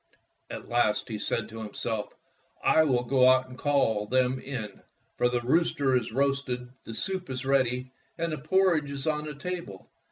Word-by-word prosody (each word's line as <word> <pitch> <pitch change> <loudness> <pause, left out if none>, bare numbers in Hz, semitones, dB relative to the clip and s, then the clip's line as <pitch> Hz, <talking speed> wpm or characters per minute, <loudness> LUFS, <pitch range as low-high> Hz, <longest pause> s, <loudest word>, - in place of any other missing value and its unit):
At - - -7
last 120 -3 +1
he 110 -2 -4
said 110 +1 -1
to 115 0 -8
himself: 110 0 -4 0.3
" - - -34
I 160 - +7
will 125 -4 +2
go 130 0 +5
out 130 0 +4
and 130 - -11
call 115 -7 +1
them 130 +2 +2
in, 115 -8 -6 0.3
for 125 - +2
the 120 -1 0
rooster 140 0 +2
is 125 -3 0
roasted, 135 -1 -1 0.2
the 115 - -7
soup 185 +4 -3
is 130 0 -4
ready, 130 -1 +1 0.3
and 170 0 -1
the 155 - -3
por 190 +5 +3
ridge 150 -3 -1
is 140 0 -4
on 150 -1 0
the 150 -1 -6
table. 140 - -6
130 Hz, 190 wpm, -28 LUFS, 120-145 Hz, 0.3 s, I